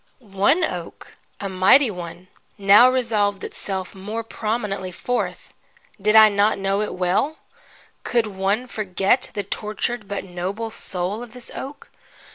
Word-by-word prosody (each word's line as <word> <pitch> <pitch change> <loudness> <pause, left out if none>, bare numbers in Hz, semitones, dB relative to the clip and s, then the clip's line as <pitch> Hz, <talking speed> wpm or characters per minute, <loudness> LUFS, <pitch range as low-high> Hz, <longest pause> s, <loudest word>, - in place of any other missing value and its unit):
One 230 - +1
oak, 180 - -5 0.3
a 200 - -3
mighty 195 +7 +5
one, 180 0 -8 0.3
now 205 +5 +7
resolved 215 -6 0
itself 190 -2 -5
more 210 +4 -5
prominently 210 -4 -3
forth. 245 +7 -3 0.5
Did 210 +2 +2
I 220 0 +10
not 205 +1 +2
know 195 +1 0
it 210 - -3
well? 185 - 0 0.7
Could 235 -2 +1
one 200 +3 -1
forget 205 +1 0
the 205 - -1
tortured 215 +3 -4
but 200 0 -4
noble 190 +5 -4
soul 190 0 -2
of 240 -2 -10
this 250 -1 -8
oak? 280 +2 -8
205 Hz, 135 wpm, -22 LUFS, 190-230 Hz, 0.7 s, I